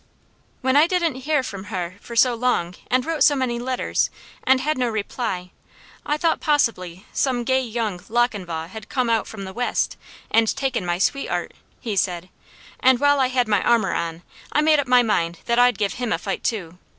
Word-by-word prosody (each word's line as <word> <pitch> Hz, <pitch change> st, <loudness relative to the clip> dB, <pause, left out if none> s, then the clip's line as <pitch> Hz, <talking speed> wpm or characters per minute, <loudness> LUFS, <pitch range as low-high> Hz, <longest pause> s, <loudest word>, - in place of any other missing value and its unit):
"When 260 Hz, 0 st, +1 dB
I 300 Hz, +3 st, +6 dB
didn't 345 Hz, -4 st, +1 dB
heah 300 Hz, -3 st, +2 dB
from 200 Hz, -5 st, -7 dB
heh 180 Hz, -4 st, -4 dB
for 235 Hz, -, -9 dB
so 245 Hz, +1 st, +5 dB
long, 230 Hz, -8 st, 0 dB, 0.2 s
and 255 Hz, 0 st, +2 dB
wrote 320 Hz, -2 st, -2 dB
so 290 Hz, -, +5 dB
many 250 Hz, -3 st, -1 dB
letters, 255 Hz, +1 st, 0 dB, 0.3 s
and 260 Hz, 0 st, +4 dB
had 305 Hz, +4 st, 0 dB
no 250 Hz, -2 st, 0 dB
reply, 205 Hz, -4 st, -3 dB, 0.5 s
I 295 Hz, -, 0 dB
thought 330 Hz, +1 st, +1 dB
possibly 205 Hz, -, 0 dB
some 250 Hz, -3 st, 0 dB
gay 260 Hz, +2 st, +2 dB
'young 225 Hz, -6 st, -3 dB
Lochinvah 200 Hz, -9 st, -1 dB
had 220 Hz, +3 st, -10 dB
come 250 Hz, -3 st, 0 dB
out 225 Hz, -, +1 dB
from 200 Hz, -3 st, -8 dB
the 190 Hz, 0 st, -7 dB
west,' 245 Hz, +3 st, -1 dB, 0.3 s
and 225 Hz, 0 st, +4 dB
taken 265 Hz, -9 st, -1 dB
my 175 Hz, 0 st, 0 dB
sweet 275 Hz, +9 st, 0 dB
'eart," -, -, -2 dB, 0.3 s
he 220 Hz, -4 st, -3 dB
said, 180 Hz, -2 st, -1 dB, 0.5 s
"and 260 Hz, -1 st, +4 dB
while 285 Hz, 0 st, +4 dB
I 260 Hz, -, +3 dB
had 250 Hz, -2 st, +1 dB
my 205 Hz, -3 st, +2 dB
armour 235 Hz, -2 st, +2 dB
on, 165 Hz, 0 st, -3 dB, 0.3 s
I 300 Hz, -, +3 dB
made 305 Hz, -1 st, +4 dB
up 280 Hz, -, -1 dB
my 250 Hz, -1 st, +5 dB
mind 170 Hz, -6 st, 0 dB
that 235 Hz, 0 st, +2 dB
I'd 245 Hz, 0 st, +5 dB
give 200 Hz, -3 st, 0 dB
him 245 Hz, -2 st, -3 dB
a -, -, +2 dB
fight 195 Hz, +3 st, -4 dB
too. 180 Hz, -7 st, -3 dB
240 Hz, 200 wpm, -22 LUFS, 195-260 Hz, 0.5 s, I